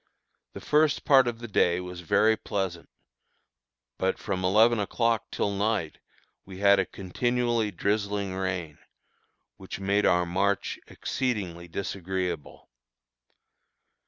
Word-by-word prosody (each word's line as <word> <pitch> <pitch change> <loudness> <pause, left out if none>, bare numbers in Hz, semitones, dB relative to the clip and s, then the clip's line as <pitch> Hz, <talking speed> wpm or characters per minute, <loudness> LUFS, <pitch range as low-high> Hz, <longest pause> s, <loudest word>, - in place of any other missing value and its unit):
The - - -8
first 150 0 +2
part 135 -4 +6
of 120 -1 -2
the 120 0 -8
day 90 -4 +2
was 90 -1 -7
very 110 +6 +3
pleasant, 95 -6 -4 1.1
but 95 0 0
from 95 -2 -3
eleven 110 +5 +4
o'clock 115 +2 0
till 100 - -1
night 100 -5 -1 0.4
we 95 -1 -11
had 100 0 +5
a - - 0
continually 120 +3 -1
drizzling 100 0 -1
rain, 90 -5 -3 0.8
which - - -8
made 100 +1 +2
our 90 0 +3
march 95 +3 0
exceedingly 95 -9 -3
disagreeable. 90 -2 -4
100 Hz, 115 wpm, -27 LUFS, 90-110 Hz, 1.1 s, part